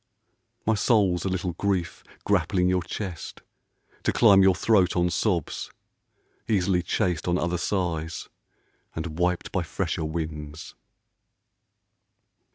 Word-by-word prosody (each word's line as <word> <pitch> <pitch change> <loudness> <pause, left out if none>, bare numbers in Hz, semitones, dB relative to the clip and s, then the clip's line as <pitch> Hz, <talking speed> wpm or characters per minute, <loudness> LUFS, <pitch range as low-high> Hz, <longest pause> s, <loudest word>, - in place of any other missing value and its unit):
My 110 - +3
soul's 100 -5 +2
a - - +1
little 90 -1 -2
grief, 95 -2 -2 0.2
grappling 90 -1 +2
your 90 0 +2
chest, 90 -1 -6 0.6
To - - +1
climb 100 -5 +6
your 95 -1 +5
throat 95 -5 +3
on 90 -1 +2
sobs; 90 -7 -1 0.8
easily 95 -4 +2
chased 90 -2 -1
On 90 0 +2
other 85 0 -1
sighs 85 -4 -2 0.7
and 80 0 -5
wiped 90 0 0
by 95 - 0
fresher 80 -1 -2
winds. 80 -1 -5
90 Hz, 115 wpm, -26 LUFS, 85-95 Hz, 0.8 s, climb